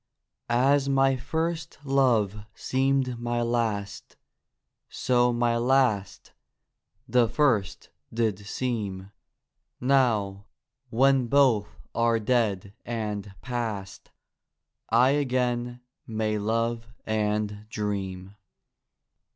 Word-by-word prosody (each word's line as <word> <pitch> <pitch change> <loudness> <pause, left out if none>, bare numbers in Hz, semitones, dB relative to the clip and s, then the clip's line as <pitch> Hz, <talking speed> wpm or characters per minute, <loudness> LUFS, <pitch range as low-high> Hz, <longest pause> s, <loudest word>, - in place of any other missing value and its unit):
As 135 +3 +3
my 135 0 +3
first 160 +5 -3
love 115 -7 +2
seemed 130 -2 0
my 120 0 -1
last, 115 -4 -2 0.7
So 125 -1 +2
my 120 0 +1
last 120 -5 +1 0.4
— - - -49
the 120 -2 +3
first 115 -11 0 0.2
did 110 -4 0
seem; 100 -4 -3 0.7
Now, 115 -7 +1 0.4
when 130 +2 +3
both 115 -6 +2
are 115 0 +2
dead 105 -4 0
and 105 -4 -4
past, 110 -6 -4 0.8
I 120 +4 +5
again 125 -3 -1 0.3
may 110 -1 -1
love 115 +2 -1 0.2
and 105 -1 -1
dream. 100 -3 -4
115 Hz, 85 wpm, -26 LUFS, 105-130 Hz, 0.8 s, I